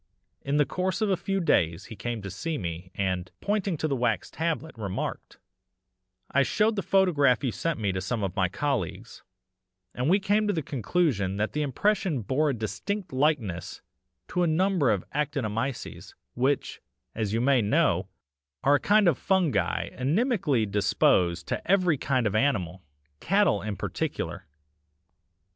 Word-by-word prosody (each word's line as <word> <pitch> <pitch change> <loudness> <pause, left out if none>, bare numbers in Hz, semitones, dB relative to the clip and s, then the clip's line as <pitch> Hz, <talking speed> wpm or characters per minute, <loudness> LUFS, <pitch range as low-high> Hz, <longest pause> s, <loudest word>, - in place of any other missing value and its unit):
In 140 +1 -1
the 150 - +4
course 185 +6 -2
of 210 -2 +2
a - - +4
few 195 +2 -2
days 85 - +1
he 110 - -9
came 115 0 -4
to 100 - -5
see 155 - -3
me, 85 -1 -5
and, 95 -2 -1
pointing 200 -4 -1
to 155 - -1
the 140 - 0
wax 125 -1 -1
tablet, 160 -1 -2
remarked: 100 -5 -5 0.9
"'I 140 - +4
showed 215 - +2
the 200 - -1
photograph 155 -11 +3
you 130 - 0
sent 155 - -2
me 100 -3 0
to 95 0 -3
some 110 +3 -2
of 95 -2 -2
my 95 -3 +1
colleagues, 115 - -3 0.7
and 125 +4 -1
we 195 +4 +5
came 205 +2 +1
to 205 - +1
the 160 -4 -2
conclusion 120 - 0
that 105 +1 -1
the 150 - -1
impression 155 - 0
bore 145 +8 +1
a - - +1
distinct 115 - -4
likeness 130 - -1 0.5
to 180 - 0
a 175 - +3
number 170 -3 +2
of 100 -4 0
actinomyces, 135 -4 -3 0.2
which, 130 +2 -1 0.3
as 110 -3 -2
you 115 - 0
may 130 0 +3
know, 105 - +2 0.6
are 140 - +5
a 145 - +4
kind 210 +3 +4
of 160 -7 +3
fungi 185 -6 +1
inimically 150 - +1
disposed 95 -3 +2
to - - -2
every 180 -7 +3
kind 130 -3 0
of 105 - 0
animal 100 - 0 0.4
cattle 190 - +2
in 105 0 -4
particular. - - -4
135 Hz, 160 wpm, -27 LUFS, 105-175 Hz, 0.9 s, we